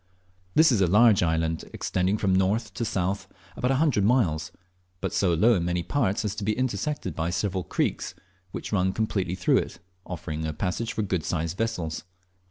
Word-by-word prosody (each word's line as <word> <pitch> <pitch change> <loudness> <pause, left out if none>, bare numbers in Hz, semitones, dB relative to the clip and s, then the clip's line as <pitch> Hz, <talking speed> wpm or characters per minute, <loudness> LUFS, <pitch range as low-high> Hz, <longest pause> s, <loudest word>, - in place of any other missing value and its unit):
This 160 -2 +6
is 110 -5 +2
a 95 - +4
large 105 +3 +5
island, 80 -1 0
extending 95 +3 0
from 100 -3 +1
north 100 +4 +1
to - - -3
south 95 -2 -1 0.3
about 125 - 0
a 135 - +3
hundred 140 -8 +2
miles, 100 -9 +2 0.5
but - - -3
so 90 -4 +2
low 110 +9 +5
in 90 -6 +1
many 90 0 0
parts 115 -5 0
as 100 - -1
to 110 - -3
be 105 +1 0
intersected 130 - -2
by 80 +1 -1
several 95 0 -1
creeks, - - -2 0.3
which - - -6
run 95 -2 +1
completely 95 -5 -1
through 90 -1 +3
it, - - -2 0.3
offering 80 -3 -5
a 80 -1 -2
passage 100 +8 -2
for 110 - -1
good 95 -5 -1
sized 80 +1 -2
vessels. 90 -8 -2
95 Hz, 185 wpm, -26 LUFS, 85-110 Hz, 0.5 s, This